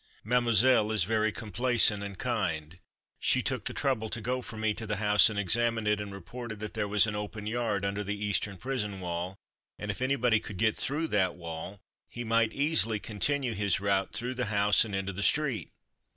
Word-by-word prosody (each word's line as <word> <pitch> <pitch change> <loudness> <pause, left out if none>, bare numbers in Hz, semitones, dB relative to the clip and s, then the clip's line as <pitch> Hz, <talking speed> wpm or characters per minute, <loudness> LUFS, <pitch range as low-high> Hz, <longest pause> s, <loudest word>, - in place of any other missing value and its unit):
Mademoiselle 120 -1 +3
is 110 -5 +2
very 110 +2 +1
complacent 110 0 +1
and 100 -2 -6
kind. 90 -9 -2 0.4
She - - +2
took - - -2
the - - -1
trouble 115 -5 0
to 110 - -4
go 125 +3 -2
for 110 - -9
me 110 0 +1
to 110 +1 -7
the 105 - 0
house 105 0 +5
and 110 - -5
examine 115 +3 +2
it, 105 0 +1
and 100 -1 -6
reported 110 +4 -8
that 105 0 -6
there 105 - -1
was 105 0 +4
an 105 -1 -3
open 105 0 -5
yard 110 -3 -1
under 100 +1 -2
the 105 +1 -3
eastern 100 -1 -1
prison 105 -5 -3
wall, 90 +1 -4 0.4
and 105 0 -3
if 100 - -8
anybody 125 -4 +2
could 105 -2 -8
get 110 +2 +2
through 150 +4 0
that 95 -3 +1
wall 85 +3 -7 0.3
he 120 - -6
might 115 -1 +2
easily 140 -6 +1
continue 125 +5 -1
his 100 -1 0
route 100 -1 0
through 125 +2 -2
the 125 -1 -2
house 105 -1 +3
and 105 -4 -5
into 95 0 -2
the 100 - -5
street. 140 0 +1
105 Hz, 200 wpm, -29 LUFS, 100-120 Hz, 0.4 s, house